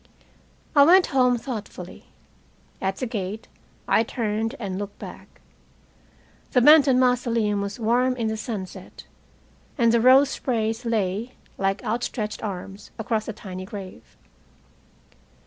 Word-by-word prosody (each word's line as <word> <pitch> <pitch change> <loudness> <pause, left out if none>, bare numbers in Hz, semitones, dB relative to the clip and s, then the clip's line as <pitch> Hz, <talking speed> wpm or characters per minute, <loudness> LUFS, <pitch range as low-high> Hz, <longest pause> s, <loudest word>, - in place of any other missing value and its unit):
I 285 - +7
went 360 +5 +6
home 250 -2 +4
thoughtfully. 215 -7 -7 0.8
At 190 0 -1
the 255 - -3
gate 215 -2 -5 0.4
I - - +4
turned 225 +1 -2
and 195 -4 -4
looked 205 0 -6
back. - - -11 1.1
The 255 - +5
Benton 285 -1 +7
Mausoleum 235 -5 +1
was 200 +3 -5
warm 245 +3 +2
in 235 -2 -2
the 220 - -1
sunset, 210 -4 -7 0.7
and 235 -3 +4
the 235 0 +3
rose 265 +3 +6
sprays 225 -1 -2
lay, 220 +1 -1 0.3
like 195 +1 0
outstretched 220 -1 -3
arms, 195 -1 -7
across 220 -1 -2
the 220 - -4
tiny 185 -3 -8
grave. 195 -1 -10
225 Hz, 125 wpm, -24 LUFS, 205-250 Hz, 1.1 s, I